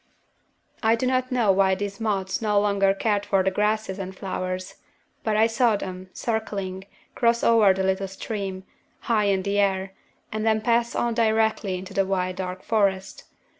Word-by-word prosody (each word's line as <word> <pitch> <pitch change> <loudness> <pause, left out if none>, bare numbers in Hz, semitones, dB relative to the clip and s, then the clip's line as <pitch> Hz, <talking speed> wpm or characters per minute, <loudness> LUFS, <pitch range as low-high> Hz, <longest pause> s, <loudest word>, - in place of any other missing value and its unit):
"I 225 0 +4
do 230 - -2
not 255 0 0
know 235 -5 +3
why 190 0 +3
these 200 0 -5
moths 200 -4 -1
no 210 -2 +2
longer 200 -1 +2
cared 205 +1 0
for 195 -2 +1
the 190 - +1
grasses 210 0 -1
and 190 -1 -6
flowers. 185 0 -4 0.5
But 215 -1 0
I 220 - +5
saw 230 0 +2
them, 185 -2 -6
circling, 195 -5 -3 0.3
cross 235 0 +2
over 225 -4 +5
the 190 0 0
little 190 +1 0
stream, 195 -1 -5 0.4
high 215 -3 +1
in 195 -2 +1
the 200 +1 0
air, 190 -1 0 0.4
and 215 0 -3
then 220 -1 +2
pass 235 +1 +1
on 235 -1 0
directly 220 -4 +1
into 185 +1 -9
the 195 -1 +1
wide 185 -1 -1
dark 185 0 -5
forest. 195 -3 0
200 Hz, 170 wpm, -24 LUFS, 190-220 Hz, 0.5 s, I